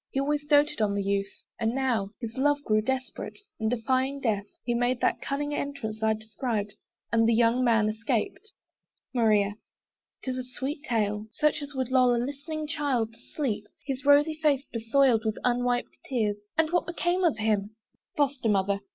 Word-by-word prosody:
He 270 Hz, -, -2 dB
always 290 Hz, +1 st, 0 dB
doted 295 Hz, -3 st, +3 dB
on 205 Hz, -1 st, +2 dB
the 200 Hz, -, 0 dB
youth, 200 Hz, 0 st, 0 dB, 0.3 s
and 225 Hz, +2 st, 0 dB
now 245 Hz, -7 st, 0 dB
His 230 Hz, -2 st, -6 dB
love 285 Hz, +2 st, +2 dB
grew 215 Hz, -4 st, +2 dB
desperate; 260 Hz, +3 st, -3 dB, 0.2 s
and 220 Hz, 0 st, +1 dB
defying 260 Hz, +4 st, 0 dB
death, 210 Hz, -6 st, 0 dB, 0.2 s
He 240 Hz, -, 0 dB
made 245 Hz, +1 st, +1 dB
that -, -, +1 dB
cunning 290 Hz, +1 st, -2 dB
entrance 280 Hz, -7 st, -4 dB
I 220 Hz, 0 st, +3 dB
described: 220 Hz, -1 st, -3 dB, 0.4 s
And 225 Hz, 0 st, +4 dB
the 230 Hz, -, +4 dB
young 235 Hz, +2 st, +3 dB
man 225 Hz, -3 st, +4 dB
escaped. 225 Hz, -, -2 dB, 0.6 s
MARIA. 210 Hz, -4 st, +3 dB, 0.7 s
'Tis 255 Hz, -1 st, -2 dB
a -, -, -3 dB
sweet 265 Hz, +4 st, -5 dB
tale: 210 Hz, -3 st, 0 dB
Such 300 Hz, -1 st, +1 dB
as 285 Hz, 0 st, -8 dB
would 260 Hz, -1 st, -2 dB
lull 255 Hz, -2 st, +5 dB
a -, -, 0 dB
listening 285 Hz, +5 st, -3 dB
child 275 Hz, -7 st, -1 dB
to 230 Hz, -, -20 dB
sleep, 225 Hz, -9 st, -3 dB, 0.2 s
His 270 Hz, -1 st, -3 dB
rosy 290 Hz, +2 st, +5 dB
face 285 Hz, -3 st, +2 dB
besoiled 230 Hz, 0 st, +3 dB
with 220 Hz, -1 st, -1 dB
unwiped 245 Hz, 0 st, 0 dB
tears. 210 Hz, -5 st, 0 dB, 0.2 s
And 320 Hz, 0 st, +3 dB
what 350 Hz, -, +1 dB
became 350 Hz, +1 st, 0 dB
of 320 Hz, -10 st, +3 dB
him? 215 Hz, -1 st, 0 dB, 0.4 s
FOSTER 275 Hz, -5 st, +1 dB
MOTHER. 200 Hz, 0 st, +2 dB
245 Hz, 175 wpm, -28 LUFS, 220-280 Hz, 0.7 s, lull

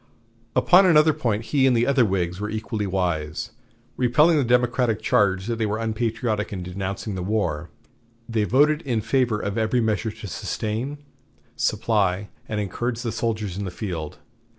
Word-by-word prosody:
Upon 185 Hz, +1 st, +6 dB
another 155 Hz, -2 st, +5 dB
point 115 Hz, -8 st, -1 dB
he 135 Hz, -2 st, +4 dB
and 125 Hz, -2 st, +3 dB
the 115 Hz, -, +3 dB
other 140 Hz, -2 st, +3 dB
Whigs 90 Hz, -3 st, -1 dB
were 105 Hz, 0 st, -3 dB
equally 110 Hz, -1 st, -3 dB
wise. 85 Hz, -5 st, -2 dB, 0.5 s
Repelling 150 Hz, +7 st, +4 dB
the 145 Hz, -, +3 dB
Democratic 120 Hz, -2 st, +2 dB
charge 95 Hz, -2 st, +2 dB
that 115 Hz, 0 st, -2 dB
they 110 Hz, -, 0 dB
were 105 Hz, +1 st, -1 dB
unpatriotic 110 Hz, -1 st, -2 dB
in 95 Hz, -3 st, -4 dB
denouncing 95 Hz, +3 st, -4 dB
the 95 Hz, -, -4 dB
war, 90 Hz, -5 st, -1 dB, 0.6 s
they 115 Hz, -2 st, 0 dB
voted 150 Hz, +6 st, +3 dB
in 120 Hz, -8 st, -1 dB
favor 115 Hz, -1 st, +1 dB
of 100 Hz, +2 st, -2 dB
every 110 Hz, +3 st, +1 dB
measure 110 Hz, 0 st, 0 dB
to 105 Hz, -, -9 dB
sustain, 110 Hz, -, -3 dB, 0.6 s
supply, 100 Hz, -3 st, 0 dB, 0.2 s
and 110 Hz, -, -2 dB
encourage 120 Hz, +5 st, -3 dB
the 115 Hz, -, -2 dB
soldiers 110 Hz, -5 st, -2 dB
in -, -, -2 dB
the 95 Hz, -, -3 dB
field. 85 Hz, -5 st, -5 dB
110 Hz, 165 wpm, -24 LUFS, 100-120 Hz, 0.6 s, Upon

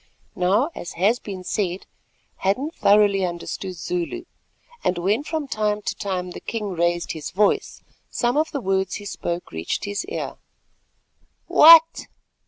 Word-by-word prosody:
Now, 200 Hz, -, +2 dB
as 175 Hz, -, -7 dB
has 210 Hz, +8 st, +2 dB
been 190 Hz, -3 st, -7 dB
said, 185 Hz, -1 st, -2 dB, 0.5 s
Hadden 250 Hz, +11 st, -1 dB
thoroughly 205 Hz, -, +3 dB
understood 180 Hz, +1 st, -4 dB
Zulu; 180 Hz, -, -3 dB, 0.6 s
and, 180 Hz, -, 0 dB
when 200 Hz, +9 st, 0 dB
from 310 Hz, -1 st, -3 dB
time 210 Hz, -3 st, -1 dB
to -, -, -2 dB
time 185 Hz, -2 st, -4 dB
the -, -, -8 dB
king 215 Hz, -3 st, -4 dB
raised 175 Hz, 0 st, 0 dB
his 155 Hz, -2 st, -6 dB
voice, 200 Hz, +3 st, 0 dB, 0.3 s
some 240 Hz, 0 st, 0 dB
of 310 Hz, +2 st, +1 dB
the 280 Hz, -, -4 dB
words 190 Hz, -2 st, 0 dB
he 205 Hz, -, -7 dB
spoke 175 Hz, -3 st, -4 dB
reached 80 Hz, +1 st, -3 dB
his 205 Hz, 0 st, -3 dB
ear. 440 Hz, -, -5 dB, 1.1 s
"What!" 330 Hz, +1 st, +7 dB
200 Hz, 145 wpm, -23 LUFS, 180-230 Hz, 1.1 s, What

